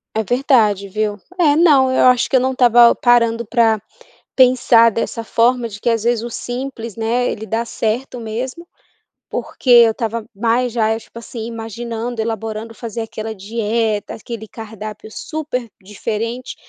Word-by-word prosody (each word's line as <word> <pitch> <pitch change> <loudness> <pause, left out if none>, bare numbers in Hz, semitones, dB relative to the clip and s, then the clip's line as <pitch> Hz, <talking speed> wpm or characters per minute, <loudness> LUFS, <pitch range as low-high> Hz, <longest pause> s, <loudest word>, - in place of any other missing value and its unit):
É 220 - +1
verdade 220 -4 +2
viu. 210 +1 -2 0.2
É, 300 -4 +4
não, 290 -6 +5
eu 260 - +3
acho 250 -1 +4
que - - +1
eu - - +6
não 260 +1 0
estava 240 -2 +6
parando 235 -1 +2
pra 225 -2 +2 0.5
pensar 245 -3 +5
dessa 230 +1 -3
forma 235 +1 +1
de 200 -1 -10
que, 235 - 0
às 225 -2 0
vezes, 235 -1 +1
o 235 - -5
simples 245 -2 -6
né, 235 +2 0
ele 220 - -6
dá 225 +2 -1
certo 235 +2 -3
mesmo 250 +9 -5 0.6
porque 255 - -4
eu 235 -2 +8
estava 230 0 -3
mais 235 +3 +1
já 220 -2 +1
é 220 - 0
tipo 230 - -13
assim 230 -1 -7
imaginando 230 +1 -5
elaborando 225 0 -4
fazer 230 0 -6
aquela 220 0 -5
dieta, 220 +1 -2
aquele 220 0 -8
cardápio 215 -1 -9
super 255 -3 -5
diferente, 225 +5 -4
230 Hz, 160 wpm, -18 LUFS, 220-245 Hz, 0.6 s, eu